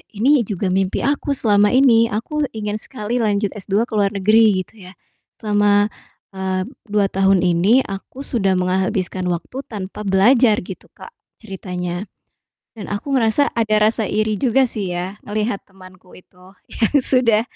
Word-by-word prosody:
ini 270 Hz, +7 st, +3 dB
juga 195 Hz, -2 st, -2 dB
mimpi 190 Hz, +2 st, 0 dB
aku 285 Hz, +1 st, 0 dB
selama 210 Hz, -4 st, +3 dB
ini, 235 Hz, -4 st, +5 dB
aku 285 Hz, +8 st, -2 dB
ingin 210 Hz, 0 st, -3 dB
sekali 240 Hz, -1 st, -4 dB
lanjut 205 Hz, -3 st, 0 dB
S2 205 Hz, +1 st, -1 dB
ke 235 Hz, -, -9 dB
luar 200 Hz, -1 st, +1 dB
negeri 210 Hz, -1 st, +3 dB
gitu 195 Hz, -3 st, -16 dB
ya. 185 Hz, -, -14 dB, 0.4 s
Selama, 205 Hz, 0 st, +2 dB, 0.4 s
eee, 190 Hz, -1 st, -2 dB, 0.2 s
2 205 Hz, -1 st, 0 dB
tahun 195 Hz, -1 st, +2 dB
ini 185 Hz, +9 st, +3 dB
aku 195 Hz, +7 st, -8 dB
sudah 195 Hz, -8 st, 0 dB
menghabiskan 185 Hz, 0 st, -1 dB
waktu 180 Hz, +9 st, -4 dB
tanpa 200 Hz, -1 st, -7 dB
belajar 215 Hz, +2 st, +4 dB
gitu, 185 Hz, -, -10 dB
Kak, -, -, -12 dB, 0.3 s
ceritanya, 180 Hz, -1 st, -5 dB, 0.7 s
dan 215 Hz, -4 st, -9 dB
aku 205 Hz, +7 st, -4 dB
ngerasa 255 Hz, +3 st, +2 dB
ada 215 Hz, -2 st, +1 dB
rasa 220 Hz, -1 st, +1 dB
iri 215 Hz, -1 st, -1 dB
juga 265 Hz, +1 st, +3 dB
sih 210 Hz, -6 st, -3 dB
ya 185 Hz, +4 st, -6 dB
ngelihat 210 Hz, 0 st, -2 dB
temanku 185 Hz, -1 st, -17 dB
itu 185 Hz, +1 st, -19 dB, 0.2 s
yang 225 Hz, +5 st, -1 dB
sudah, 230 Hz, -4 st, +3 dB
205 Hz, 150 wpm, -19 LUFS, 190-225 Hz, 0.7 s, ini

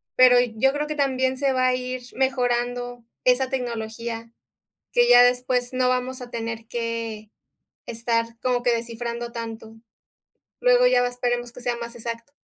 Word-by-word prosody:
pero 255 Hz, -1 st, +7 dB
yo 245 Hz, +2 st, +2 dB
creo 295 Hz, +1 st, -2 dB
que 305 Hz, -, -3 dB
también 260 Hz, -2 st, +1 dB
se 275 Hz, 0 st, +1 dB
va 255 Hz, 0 st, +2 dB
a 255 Hz, -, +3 dB
ir 255 Hz, 0 st, -4 dB
mejorando 245 Hz, -2 st, -1 dB, 0.2 s
esa 255 Hz, +1 st, +3 dB
tecnología, 230 Hz, -2 st, -4 dB, 0.6 s
que 485 Hz, 0 st, +4 dB
ya 245 Hz, 0 st, +9 dB
después 245 Hz, 0 st, +1 dB
no 255 Hz, 0 st, +2 dB
vamos 255 Hz, 0 st, -1 dB
a 245 Hz, -, -8 dB
tener 230 Hz, -1 st, -5 dB
que 230 Hz, -2 st, -4 dB, 0.6 s
estar 230 Hz, 0 st, -1 dB
como 250 Hz, -1 st, 0 dB
que 245 Hz, -1 st, +3 dB
descifrando 235 Hz, +1 st, -4 dB
tanto. 225 Hz, -1 st, -7 dB, 0.9 s
Luego -, -, +5 dB
ya 245 Hz, -, +4 dB
va 245 Hz, -, +1 dB
esperemos 245 Hz, -1 st, -2 dB
que 250 Hz, -, -10 dB
sea 245 Hz, -1 st, -1 dB
más 235 Hz, 0 st, -7 dB
exacto. 230 Hz, +2 st, -6 dB
245 Hz, 160 wpm, -24 LUFS, 230-255 Hz, 0.9 s, ya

